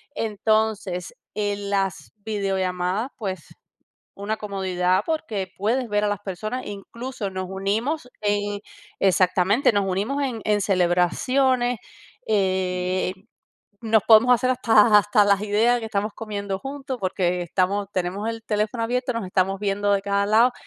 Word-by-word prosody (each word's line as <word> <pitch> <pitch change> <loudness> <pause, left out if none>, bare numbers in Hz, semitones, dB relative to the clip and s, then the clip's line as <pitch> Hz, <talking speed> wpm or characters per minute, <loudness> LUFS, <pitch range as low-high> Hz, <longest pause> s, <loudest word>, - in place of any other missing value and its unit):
Entonces, 215 -4 -1 0.2
en 205 -1 -2
las 195 -1 -1
videollamadas, 195 +1 -1
pues, 190 - -6 0.6
una 205 +2 -3
comodidad 190 -2 0
porque 215 - -2
puedes 235 +5 0
ver 210 0 +1
a - - +2
las 205 -1 -2
personas 215 +6 -4
e - - -5
incluso 215 +1 -6
nos 185 0 -4
unimos 220 +9 -2
en 205 -1 -1 0.4
exactamente, 190 +5 +3
nos 200 -1 +1
unimos 210 +10 -1
en 240 -5 -3
en 210 -1 +2
celebraciones. 240 +8 +2 0.5
Eh, 185 -2 0 0.7
nos 220 -2 +3
podemos 235 +3 +7
hacer 255 +1 +1
hasta 220 -4 +5
hasta 205 +1 +3
las 200 -1 +3
ideas 220 +4 +3
que 225 - -5
estamos 210 0 -2
comiendo 200 -3 -4
juntos, 270 +1 -6
porque 180 -1 0
estamos 195 +3 0
tenemos 190 +4 -2
el 225 -1 -4
teléfono 215 +2 -1
abierto, 250 +2 -1
nos 230 -4 -2
estamos 190 +1 0
viendo 205 0 0
de 195 -1 +1
cada 200 0 0
lado 230 +4 +4
205 Hz, 140 wpm, -23 LUFS, 190-225 Hz, 0.7 s, podemos